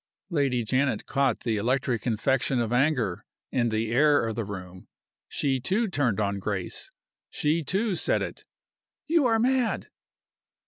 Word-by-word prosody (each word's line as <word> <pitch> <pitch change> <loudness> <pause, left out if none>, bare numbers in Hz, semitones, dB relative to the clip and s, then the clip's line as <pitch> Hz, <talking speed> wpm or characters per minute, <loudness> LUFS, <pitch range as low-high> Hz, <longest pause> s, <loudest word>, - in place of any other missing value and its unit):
Lady 135 -6 +1
Janet 130 0 0
caught 135 -4 +1
the 115 -3 0
electric 125 +1 0
infection 125 +3 +1
of 120 0 -1
anger 125 - +1 0.3
in 120 -2 +1
the 110 0 -1
air 145 +2 +4
of 110 - -2
the 115 +1 -2
room. 95 -3 -8 0.4
She, 135 -2 0
too, 200 - +1
turned 130 - 0
on 100 -1 0
Grace. 95 -2 -3 0.4
She, 155 +2 0
too, 200 +7 0
said - - +1
it: - - -7 0.6
"You 320 -4 +3
are 225 -1 +3
mad!" 250 +1 +1
130 Hz, 145 wpm, -27 LUFS, 110-150 Hz, 0.6 s, air